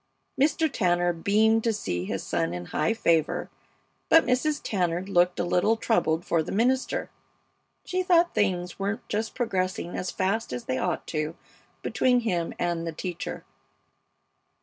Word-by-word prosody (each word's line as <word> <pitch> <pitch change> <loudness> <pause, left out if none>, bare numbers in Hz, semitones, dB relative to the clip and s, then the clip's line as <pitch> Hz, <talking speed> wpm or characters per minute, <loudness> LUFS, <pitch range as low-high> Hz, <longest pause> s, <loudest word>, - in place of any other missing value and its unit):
Mr. 300 +3 +2
Tanner 175 - +1
beamed 215 +6 +3
to 230 - +2
see 90 - -3
his - - -3
son 80 +1 -1
in 90 0 -6
high 155 - +2
favor, 170 -8 +1 0.6
but 325 - +6
Mrs. 275 +4 +1
Tanner 180 -3 0
looked 180 -2 +2
a - - +2
little 180 +6 +2
troubled 175 -8 +1
for 165 - +2
the - - -5
minister. 255 +5 0 0.7
She 370 0 -1
thought 350 -1 +3
things 180 -3 0
weren't 200 +2 -3
just 220 +2 -2
progressing 185 -6 -2
as 180 - -3
fast 195 - -1
as 125 -1 -4
they 130 0 -1
ought 180 -2 -1
to 155 0 -2 0.5
between 250 -1 +2
him 175 -7 -1
and 170 -1 -1
the - - -2
teacher. 175 +1 -5
185 Hz, 150 wpm, -26 LUFS, 170-225 Hz, 0.7 s, but